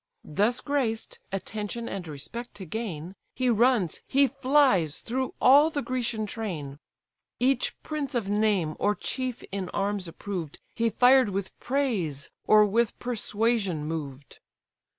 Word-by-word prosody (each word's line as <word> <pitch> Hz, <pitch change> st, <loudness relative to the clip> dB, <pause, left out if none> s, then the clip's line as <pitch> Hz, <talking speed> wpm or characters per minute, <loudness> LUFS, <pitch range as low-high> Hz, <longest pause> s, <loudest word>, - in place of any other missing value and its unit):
Thus 210 Hz, +10 st, +1 dB
graced, 255 Hz, -6 st, -2 dB
attention 210 Hz, +4 st, -4 dB
and 185 Hz, -3 st, -5 dB
respect 160 Hz, -, -7 dB
to 195 Hz, -, -8 dB
gain, 180 Hz, -4 st, -5 dB, 0.2 s
He 255 Hz, -1 st, +2 dB
runs, 230 Hz, -6 st, +2 dB
he 280 Hz, +1 st, +4 dB
flies 260 Hz, -, +2 dB
through 260 Hz, +2 st, -3 dB
all 285 Hz, +4 st, +7 dB
the 290 Hz, -3 st, -3 dB
Grecian 240 Hz, -4 st, -2 dB
train; 165 Hz, -11 st, -5 dB, 0.6 s
Each 255 Hz, 0 st, +1 dB
prince 295 Hz, -3 st, -4 dB
of 230 Hz, -5 st, 0 dB
name, 205 Hz, -6 st, +1 dB
or 205 Hz, 0 st, +2 dB
chief 255 Hz, 0 st, -3 dB
in 195 Hz, -2 st, -3 dB
arms 200 Hz, -2 st, -1 dB
approved, 165 Hz, -2 st, -6 dB
He 230 Hz, 0 st, +1 dB
fired 250 Hz, +1 st, +5 dB
with 195 Hz, -1 st, -4 dB
praise, 215 Hz, -, -1 dB, 0.2 s
or 215 Hz, 0 st, +7 dB
with 225 Hz, +2 st, +1 dB
persuasion 215 Hz, -7 st, 0 dB
moved. 145 Hz, -4 st, -6 dB
215 Hz, 130 wpm, -27 LUFS, 185-250 Hz, 0.6 s, all